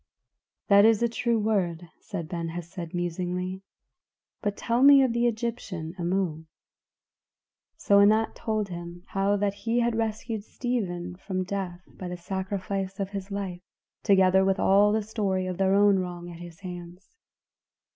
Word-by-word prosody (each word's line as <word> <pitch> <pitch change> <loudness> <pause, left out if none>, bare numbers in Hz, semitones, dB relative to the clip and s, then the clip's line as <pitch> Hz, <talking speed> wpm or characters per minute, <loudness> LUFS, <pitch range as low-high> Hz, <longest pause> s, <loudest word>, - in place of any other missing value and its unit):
"That 200 0 +7
is 225 +1 +5
a - - +4
true 235 0 0
word," 185 -6 0
said 170 -6 -6
Ben 170 0 -4
Hesed 170 0 -6
musingly. 180 +2 -3 0.8
"But 205 -2 -2
tell 235 +1 0
me 280 0 +8
of 250 -3 +1
the 235 0 +2
Egyptian, 220 -8 -3
Amu." 175 -3 -1 1.3
So 200 0 +4
Anat 215 +2 +4
told 215 -3 -2
him 175 0 -8
how 195 +1 +1
that 200 0 0
he 230 +3 0
had 235 -1 +1
rescued 220 -1 -2
Stephen 185 -8 -3
from 185 -1 -3
death 185 -2 -4
by 185 - -9
the 180 0 -5
sacrifice 190 +1 -4
of 195 -1 -2
his 195 -1 -5
life, 195 -3 -4 0.4
together 190 -2 +5
with 195 0 +1
all 200 +2 +5
the 215 0 +1
story 200 -3 -1
of 185 0 -4
their 195 0 +3
own 200 -1 +5
wrong 175 -1 -5
at 170 - -10
his 175 0 -11
hands. 180 - -9
195 Hz, 155 wpm, -27 LUFS, 175-215 Hz, 1.3 s, me